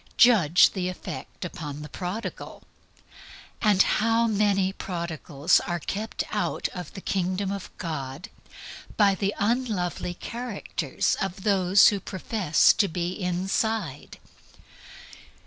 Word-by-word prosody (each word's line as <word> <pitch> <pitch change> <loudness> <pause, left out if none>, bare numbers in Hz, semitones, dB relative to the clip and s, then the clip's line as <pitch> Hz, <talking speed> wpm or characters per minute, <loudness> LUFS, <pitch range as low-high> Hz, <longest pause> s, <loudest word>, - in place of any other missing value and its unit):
Judge 195 -9 +6
of - - -19
the 185 -2 -2
effect 180 - -7
upon 150 -4 -6
the - - -7
Prodigal 185 +7 -6 1.0
and 205 -4 +5
how 230 +1 +2
many 200 -3 +2
prodigals 170 -4 0
are 175 - -3
kept 210 +7 -3
out - - -1
of 180 -1 -8
the 190 - -7
Kingdom 185 +1 -1
of 200 -2 -5
God 150 0 -5 0.7
by 205 -2 +5
the 195 +1 -1
unlovely 205 -6 -1
character 220 - -6 0.2
of 195 0 -3
those 195 -2 +5
who 205 - -2
profess 190 -4 +2
to 200 - +2
be 175 0 -2
inside. 185 -2 -2
190 Hz, 115 wpm, -26 LUFS, 175-205 Hz, 1.0 s, Judge